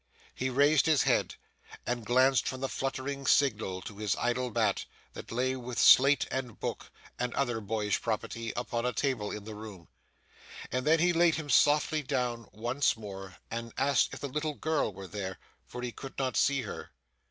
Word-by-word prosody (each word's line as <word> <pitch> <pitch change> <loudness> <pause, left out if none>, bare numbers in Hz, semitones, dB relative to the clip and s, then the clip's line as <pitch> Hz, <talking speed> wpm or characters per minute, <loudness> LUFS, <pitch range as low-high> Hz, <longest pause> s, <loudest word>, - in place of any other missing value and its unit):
He 130 - -2
raised 145 +4 +4
his 155 -3 +4
head, - - +1 0.5
and 120 -1 -2
glanced 130 +3 +3
from 130 0 -4
the 135 - 0
fluttering 135 +1 -3
signal 105 -11 +2
to 105 -1 -9
his 105 -3 0
idle 125 +1 -1
bat, 110 -4 0 0.3
that - - -9
lay 130 +3 0
with 125 -1 -6
slate 140 +2 +6
and 125 -4 -4
book - - -4 0.3
and 125 0 -2
other 120 -5 0
boyish 105 -1 -1
property 115 0 -3
upon 120 0 -2
a 125 0 0
table 125 -7 -1
in 105 - -6
the 110 +1 -8
room. 105 -5 -10 0.8
And 130 +3 -1
then 160 +1 +6
he 175 +2 +3
laid 170 -1 +4
him 150 -2 -4
softly 150 +1 +4
down 125 -5 -2
once 120 +4 0
more, 95 -3 -9
and 115 0 -5
asked 140 +1 +2
if - - -10
the 140 - -2
little 150 +2 -3
girl 155 -7 0
were 95 0 -9
there, 95 -1 -5 0.3
for 125 - -7
he 125 - -3
could 135 +3 -10
not 130 -2 -1
see 140 +1 +2
her. 105 - -7
125 Hz, 185 wpm, -30 LUFS, 110-140 Hz, 0.8 s, slate